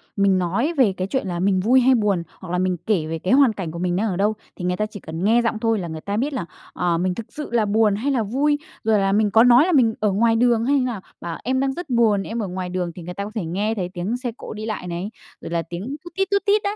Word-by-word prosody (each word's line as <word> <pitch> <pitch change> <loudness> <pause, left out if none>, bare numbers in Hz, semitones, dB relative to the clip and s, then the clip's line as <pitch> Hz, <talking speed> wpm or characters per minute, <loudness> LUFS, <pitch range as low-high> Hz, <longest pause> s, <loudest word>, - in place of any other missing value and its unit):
mình 200 -2 +3
nói 200 - 0
về 220 -8 +4
cái 185 +1 -2
chuyện 260 -3 -2
là 175 -1 -3
mình 190 0 +2
vui 250 +7 +4
hay 260 +1 +5
buồn, 200 -6 +1 0.2
hoặc 185 -2 -8
là 180 - 0
mình 185 -1 0
kể 190 -8 +1
về 160 0 -3
cái 185 +8 0
hoàn 270 -5 +5
cảnh 180 -6 -5
của 170 - -7
mình 180 -1 0
đang 215 +4 0
ở 180 - -2
đâu, 210 +2 +2 0.2
thì 180 - -6
người 180 0 0
ta 215 - 0
chỉ 210 -1 -9
cần 160 +1 -6
nghe 230 +4 +4
giọng 230 -2 -1
thôi 225 -2 +1
là 175 - -4
người 160 -1 -6
ta 200 +1 -3
biết 280 +5 -1
là, 215 -10 -3 0.3
ờ, 175 -2 0
mình 180 +1 0
thực 230 - -6
sự 300 - -6
là 230 -3 +2
buồn 210 0 +3
hay 265 +7 -1
là 250 -5 +1
vui, 280 +8 +1 0.3
rồi 215 -2 +3
là 195 0 +1
mình 210 0 +2
có 225 - +6
nói 250 +5 +6
là 370 - +1
mình 245 -8 +4
ở 210 -1 +2
ngoài 225 +3 +3
đường 235 -1 +3
hay 280 - +3
như 255 - 0
nào, 225 -6 -3 0.2
bảo: 170 -1 -5
"Em 260 +1 0
đang 270 0 0
rất 345 +1 -7
buồn, 225 -5 +3
em 230 +4 -4
ở 200 - -3
ngoài 180 0 -4
đường", 180 -1 -2
thì 180 - -8
người 180 +2 -6
ta 200 - -4
có 210 - -7
thể 195 -6 -2
nghe 205 +7 -1
thấy 180 -4 -3
tiếng 195 +7 -2
xe 245 -2 -4
cộ - - -8
đi 215 0 -6
lại 215 -5 -4
này, 175 +3 -4 0.3
rồi - - -7
là 170 - 0
tiếng 200 +12 -5
tút 345 -1 -11
tít, 390 0 +1
tút 400 - +1
tít 410 +1 +3
đấy. 405 +1 -1
210 Hz, 315 wpm, -22 LUFS, 185-240 Hz, 0.3 s, có